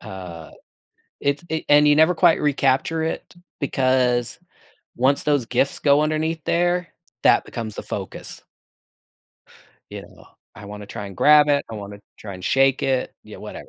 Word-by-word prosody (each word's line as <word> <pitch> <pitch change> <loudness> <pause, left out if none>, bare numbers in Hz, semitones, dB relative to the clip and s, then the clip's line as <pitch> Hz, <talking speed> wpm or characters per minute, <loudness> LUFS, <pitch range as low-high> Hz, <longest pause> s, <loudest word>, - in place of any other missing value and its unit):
uh 90 -6 -9 0.7
it's 140 +3 -1
it 160 0 -2
and 150 0 +6
you 150 - +5
never 160 +4 +4
quite 170 0 +3
recapture 145 +2 +1
it 160 +2 -5 0.3
because 130 -3 0 0.6
once 135 +3 +2
those 145 -4 +1
gifts 125 +3 0
go 145 0 +4
underneath 155 +1 -1
there, 175 0 0 0.4
that - - +4
becomes 110 -3 -7
the - - -6
focus. - - -8 1.5
You - - -8
know? - - -17 0.3
I 105 - -11
wanna 105 0 -9
try 100 0 -7
and 95 - -11
grab 150 0 +5
it, 140 -1 +2
I - - -6
wanna 100 -1 -8 0.2
try 100 -3 -9
and 90 - -10
shake 135 0 +2
it 130 -1 -1
yeah, - - -12
whatever. - - -10
135 Hz, 160 wpm, -22 LUFS, 110-150 Hz, 1.5 s, and